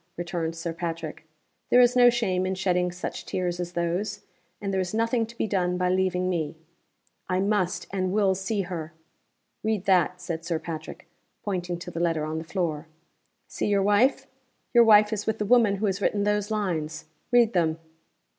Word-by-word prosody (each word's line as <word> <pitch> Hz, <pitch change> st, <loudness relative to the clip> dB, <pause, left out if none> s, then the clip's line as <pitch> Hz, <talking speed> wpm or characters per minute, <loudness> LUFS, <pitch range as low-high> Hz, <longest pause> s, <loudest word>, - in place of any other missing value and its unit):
returned 170 Hz, -1 st, -3 dB
Sir 165 Hz, 0 st, -4 dB
Patrick. 165 Hz, -2 st, -5 dB, 0.4 s
"There 245 Hz, -, +6 dB
is 245 Hz, 0 st, +5 dB
no 245 Hz, -1 st, +7 dB
shame 205 Hz, -7 st, 0 dB
in 190 Hz, -, -1 dB
shedding 180 Hz, -1 st, +1 dB
such 180 Hz, +1 st, -6 dB
tears 175 Hz, -1 st, -2 dB
as 175 Hz, 0 st, -4 dB
those. 175 Hz, +4 st, -2 dB, 0.4 s
And 200 Hz, -1 st, -3 dB
there 190 Hz, -, +1 dB
is 185 Hz, +3 st, -3 dB
nothing 230 Hz, 0 st, +1 dB
to 235 Hz, +1 st, -14 dB
be -, -, 0 dB
done 180 Hz, -4 st, 0 dB
by 180 Hz, 0 st, +1 dB
leaving 185 Hz, 0 st, +1 dB
me." 165 Hz, -4 st, -2 dB, 0.7 s
"I 185 Hz, -, +1 dB
must 190 Hz, -3 st, 0 dB
and 185 Hz, -1 st, -1 dB
will 200 Hz, -1 st, +3 dB
see 195 Hz, +2 st, -2 dB
her!" 170 Hz, -4 st, -5 dB, 0.7 s
"Read 215 Hz, -3 st, -1 dB
that," 180 Hz, -1 st, +3 dB
said 170 Hz, -2 st, -5 dB
Sir 165 Hz, -1 st, -1 dB
Patrick, 160 Hz, -1 st, -7 dB, 0.4 s
pointing 180 Hz, -3 st, -2 dB
to 175 Hz, +1 st, -8 dB
the 165 Hz, -, -5 dB
letter 165 Hz, -3 st, 0 dB
on 155 Hz, +1 st, -3 dB
the -, -, -6 dB
floor. 165 Hz, -3 st, -3 dB, 0.6 s
"See -, -, -3 dB
your 200 Hz, -1 st, +2 dB
wife? 245 Hz, +7 st, +3 dB, 0.5 s
Your 235 Hz, -1 st, +7 dB
wife 210 Hz, -1 st, +6 dB
is 210 Hz, -1 st, -3 dB
with 220 Hz, 0 st, 0 dB
the 210 Hz, -, -2 dB
woman 225 Hz, -2 st, +4 dB
who 205 Hz, +2 st, -2 dB
has 195 Hz, 0 st, -1 dB
written 205 Hz, 0 st, +1 dB
those 210 Hz, 0 st, 0 dB
lines. 175 Hz, -8 st, -2 dB, 0.3 s
Read 240 Hz, -2 st, +4 dB
them." 165 Hz, -3 st, +1 dB
185 Hz, 185 wpm, -26 LUFS, 170-210 Hz, 0.7 s, no